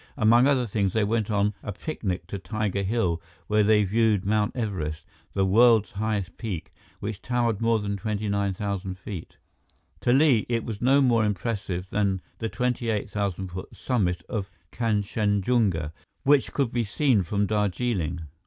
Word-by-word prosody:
Among 120 +4 +5
other 135 -3 +3
things, 100 -3 0
they 110 - +2
went 110 +1 0
on 105 0 +1
a 105 - -5
picnic 95 - -4
to 100 - -5
Tiger 105 0 -2
Hill, 95 -5 0 0.2
where 105 0 +2
they 105 0 +4
viewed 105 0 +2
Mt. 105 0 +1
Everest, 95 -10 -3 0.3
the 95 -1 +2
world's 110 +2 +5
highest 105 -3 -2
peak, 95 -9 -5 0.3
which 100 -1 -4
towered 120 -4 0
more 115 0 +3
than 100 -1 -2
29,000 100 -2 -2
feet. 95 -2 -8 0.6
To 120 - +1
Li, 135 -4 +4
it 115 -2 0
was 110 -4 -5
no 135 +3 +5
more 120 -4 +4
impressive 100 -3 -2
than 100 -2 +1 0.2
the 115 - -2
28,000 105 -6 -1
foot 95 +1 -8
summit 95 -9 0
of 100 -4 -3 0.2
Kanchenjunga, 105 -5 +1 0.3
which 140 -1 +4
could 135 -5 0
be 120 -1 0
seen 115 +1 +2
from 100 +4 0
Darjeeling. 100 -4 -1
105 Hz, 150 wpm, -26 LUFS, 95-115 Hz, 0.6 s, Among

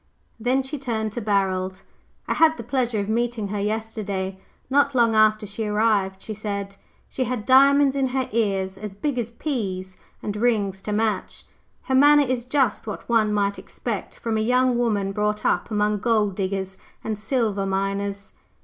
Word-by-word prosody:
Then 255 +4 +1
she 270 +2 -5
turned 220 -4 -2
to 240 - -5
Barold. 190 -2 0 0.4
"I - - +1
had 320 0 +4
the - - -6
pleasure 245 -1 -1
of 200 -1 -1
meeting 230 -1 -1
her 205 0 -2
yesterday, 205 -3 -3 0.3
not 280 +1 +2
long 235 -2 +4
after 215 0 +4
she 210 +2 -4
arrived," 210 -3 +1
she 220 - -5
said. 200 -2 -4 0.3
"She 260 - -2
had 245 -4 -3
diamonds 275 +1 +5
in 270 -1 +1
her 260 0 -1
ears 195 -4 0
as 205 -1 -7
big 255 +4 -2
as 230 -1 -2
peas, 195 -8 -4 0.3
and 210 - -3
rings 210 -4 0
to 210 - -5
match. 215 -2 -1 0.4
Her 265 - -3
manner 290 +2 +6
is 250 -2 -2
just 260 -5 +1
what 210 - -6
one 225 -3 +3
might 200 -1 0
expect - - -5
from 225 -1 -2
a - - +1
young 250 +2 +3
woman 210 -5 0
brought 210 +1 -1
up - - +1
among 210 -1 +1
gold 215 -2 +2
diggers 190 -1 -3 0.2
and 220 - -2
silver 210 -3 -1
miners." 195 +1 -2
215 Hz, 175 wpm, -24 LUFS, 200-245 Hz, 0.4 s, manner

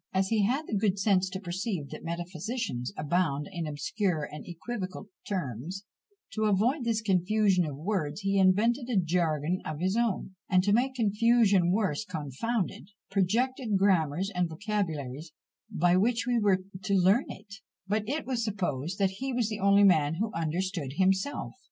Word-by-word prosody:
As 190 0 +1
he 220 -2 +2
had 275 +7 0
the - - -7
good 200 -1 +1
sense 190 -2 +2
to 190 +1 -5
perceive 185 - -3
that - - -8
metaphysicians 175 - -4
abound 150 -2 0
in 170 -4 -4
obscure 160 +3 -1
and 150 0 -7
equivocal 185 +2 -6 0.2
terms, 180 - -4 0.5
to 215 0 -1
avoid 235 +7 +2
this 225 -1 +1
"confusion 190 -1 +2
of 140 -2 -6
words," 160 -1 -2
he 195 0 +1
invented 230 +7 +3
a 235 - +1
jargon 170 -1 0
of 155 -1 -5
his 185 +3 0
own; 230 -5 0 0.2
and 185 -1 +4
to 200 +1 +2
make 260 +4 +2
"confusion 215 -4 +3
worse 195 -3 0
confounded," 180 - -3 0.2
projected 225 +3 +1
grammars 185 -1 +2
and 180 -1 0
vocabularies 160 - -3 0.4
by 175 +2 +2
which 230 +6 +2
we 245 -1 +2
were 195 -3 +2 0.2
to 200 +1 0
learn 195 +7 +4
it; 205 -2 -10 0.3
but 210 +2 0
it 300 +3 -2
is 250 -3 -1
supposed 180 - -2
that 195 -2 +2
he 270 0 -2
was 240 -3 0
the 215 -1 -4
only 200 +1 +5
man 160 -5 +4
who 215 +5 -2
understood 165 -2 -2
himself. 190 - 0
190 Hz, 165 wpm, -29 LUFS, 170-215 Hz, 0.5 s, only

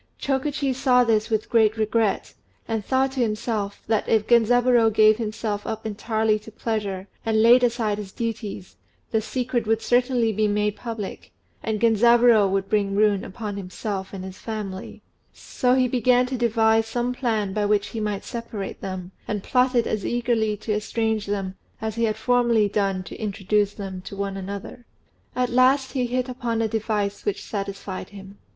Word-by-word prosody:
Chokichi 275 0 -1
saw 250 -1 +4
this 225 -1 +1
with 220 -1 0
great 220 -1 +3
regret, 215 -1 0 0.3
and 225 -2 -2
thought 265 +3 +1
to 265 - -5
himself 215 -3 -2
that 220 -1 0
if 220 -2 +3
Genzaburô 240 0 +4
gave 215 0 +5
himself 215 -2 -3
up 220 0 -4
entirely 220 0 0
to 215 +1 -13
pleasure, 205 -4 -3 0.2
and 220 -1 +2
laid 245 +2 +7
aside 230 -4 +1
his 200 -2 -7
duties, 215 -4 -5 0.3
the 220 - +2
secret 240 +1 -2
would 225 0 +2
certainly 245 -2 +2
be 215 +1 +1
made 210 0 0
public, 225 -5 -6 0.3
and 220 -1 -2
Genzaburô 230 -1 +5
would 195 0 -1
bring 200 -1 0
ruin 205 -2 +2
on 210 -3 -4
himself 190 +1 -5
and 190 -1 -7
his 190 0 -9
family; 205 -4 -6 0.3
so 250 0 0
he 255 -1 +3
began 250 0 +3
to 260 +1 -3
devise 225 -2 +2
some 240 +2 -1
plan 220 -6 -1
by 210 0 0
which 205 -1 +1
he 225 - -5
might 210 -2 -2
separate 230 -5 -6
them, 185 -1 -5 0.2
and 210 -2 -3
plotted 250 -2 +2
as 215 -2 -2
eagerly 230 -3 0
to 215 +1 -3
estrange 220 0 -1
them 195 -2 -2 0.3
as 220 -1 -3
he 230 +1 0
had 215 -1 -1
formerly 240 -4 +3
done 195 -2 0
to 180 - -9
introduce 205 -1 0
them 190 -3 -6
to 195 +1 -9
one 200 0 -3
another. 200 +5 -7 0.5
At 250 -1 +1
last 260 +2 +4
he 255 -3 -1
hit 250 +1 -1
upon 245 -3 -2
a 225 - +1
device 210 -2 -2
which 200 -1 -2
satisfied 195 -2 -5
him. 195 0 -12
220 Hz, 170 wpm, -24 LUFS, 205-240 Hz, 0.5 s, laid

